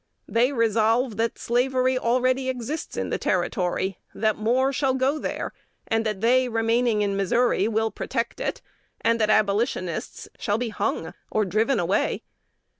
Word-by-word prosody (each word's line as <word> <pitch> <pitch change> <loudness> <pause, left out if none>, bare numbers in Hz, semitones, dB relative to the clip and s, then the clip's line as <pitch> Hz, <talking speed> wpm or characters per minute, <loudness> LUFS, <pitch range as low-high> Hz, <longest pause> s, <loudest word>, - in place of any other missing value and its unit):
They 240 +4 +2
resolve 230 -1 +2
that 230 +1 0
slavery 255 +2 +1
already 255 +2 +1
exists 260 +5 -4
in - - -2
the - - -1
Territory; 190 0 -1 0.2
that 215 0 +1
more 255 +5 +1
shall 260 0 +1
go 270 +4 +1
there; - - -4 0.3
and 225 0 +1
that 210 -3 -3
they, 250 +2 +3
remaining 225 -1 +2
in 200 -1 0
Missouri, 200 +2 +2
will 220 0 0
protect 235 -2 -3
it, - - -3 0.4
and 230 0 +2
that 215 - +2
Abolitionists 205 - 0
shall 205 -2 0
be 240 0 -2
hung 215 - -2 0.2
or 215 -1 +1
driven 220 +6 +1
away. 180 +3 0
230 Hz, 150 wpm, -25 LUFS, 215-255 Hz, 0.4 s, they